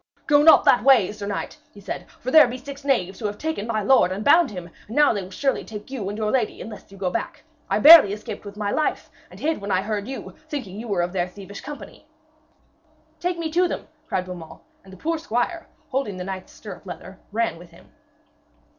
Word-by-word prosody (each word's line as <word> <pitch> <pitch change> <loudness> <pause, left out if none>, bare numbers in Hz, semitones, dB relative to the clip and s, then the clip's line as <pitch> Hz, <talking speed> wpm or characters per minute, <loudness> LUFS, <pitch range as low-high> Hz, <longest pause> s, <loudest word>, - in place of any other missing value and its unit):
'Go 290 -1 +5
not 320 +2 +7
that 245 - +5
way, 245 -8 +5
sir 205 -1 -7
knight,' 205 - -4
he 205 - -15
said, 200 - -6
'for 255 - -7
there 310 -3 +8
be 245 +1 -5
six 275 +2 -10
knaves 195 -10 0
who 215 - -2
have 205 0 -5
taken 315 -8 -3
my 215 -2 -1
lord 240 -4 +4
and 200 +3 -4
bound 335 +4 +6
him, 180 -4 -8 0.2
and 220 - -8
now 295 -3 +5
they 205 - -2
will 185 - -9
surely 270 +8 -1
take 210 +3 -9
you 220 -8 -4
and 205 - -5
your 215 -1 -1
lady 245 -5 0
unless 210 -3 -10
you 195 - -13
go 185 -2 -2
back. - - -4 0.3
I - - +2
barely 305 -9 +10
escaped 210 +1 -6
with 205 0 -10
my 205 -1 -2
life, 310 - -1 0.2
and - - -14
hid 315 -6 -1
when 200 - -5
I 185 -1 +1
heard 210 -1 -3
you, 270 - -7 0.2
thinking 215 -10 -5
you 235 - -7
were 190 -5 0
of 175 +1 -3
their 180 -2 0
thievish 200 +2 -10
company.' 295 0 -10 1.1
'Take 355 0 -1
me 325 -2 -3
to 355 +3 +3
them!' - - -5 0.2
cried 185 - -1
Beaumains, 175 -3 -9 0.2
and 190 - -15
the 190 - -12
poor 330 - -2
squire, 315 +5 -2 0.2
holding 255 -8 -2
the 180 - -5
knight's 185 0 -6
stirrup 195 -2 -11
leather, 185 +1 -9
ran 225 -5 -1
with 175 0 -14
him. 170 - -19
210 Hz, 230 wpm, -23 LUFS, 195-275 Hz, 1.1 s, barely